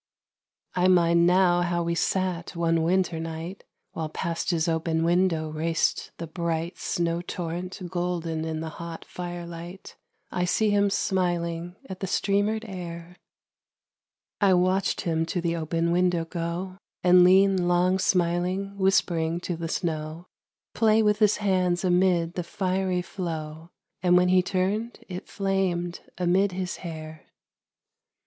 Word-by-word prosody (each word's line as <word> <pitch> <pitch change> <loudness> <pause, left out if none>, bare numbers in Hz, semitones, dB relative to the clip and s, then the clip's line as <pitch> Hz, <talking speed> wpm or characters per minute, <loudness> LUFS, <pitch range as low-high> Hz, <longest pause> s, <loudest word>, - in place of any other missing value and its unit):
I 180 0 +2
mind 170 -2 +4
now 180 -1 +4
how 175 0 0
we 170 0 -1
sat 180 0 -1
one 165 -1 +1
winter 175 0 +1
night 165 +3 -6 0.3
While 160 -1 -4
past 165 +2 -3
his 170 -2 +1
open 160 0 0
window 170 -2 +1
raced 160 +1 0
the 170 - -5
bright 165 +1 -3
Snow 170 0 -1
torrent 175 +1 -5
golden 175 -3 -2
in 160 -1 -3
the 160 - -4
hot 170 -1 -7
firelight.... 175 +1 -7 0.4
I 180 - 0
see 210 +4 +2
him 205 0 +3
smiling 175 -3 -1
at 190 -1 -7
the 195 - -3
streamered 205 +4 +1
air. 175 -2 -7 1.2
I 195 -3 +5
watched 185 +2 +1
him 165 -1 0
to 180 - -2
the 170 -1 -1
open 165 +1 -1
window 175 -1 +2
go, 170 +3 -4 0.2
And 180 0 +7
lean 190 0 +5
long 180 +2 +3
smiling, 180 +2 0
whispering 175 -4 +2
to 180 - -3
the 165 0 -5
snow, 160 -1 -3 0.5
Play 220 0 +4
with 210 0 +2
his 215 -1 +4
hands 185 -3 +1
amid 180 -2 +2
the 180 - -3
fiery 185 0 -1
flow 160 -3 -5 0.3
And 180 -1 +5
when 180 0 +4
he 185 0 +5
turned 200 +5 -1
it 180 -1 -7
flamed 185 -3 -1 0.2
amid 185 +2 +2
his 185 0 -3
hair. 160 -3 -8
175 Hz, 140 wpm, -26 LUFS, 170-185 Hz, 1.2 s, And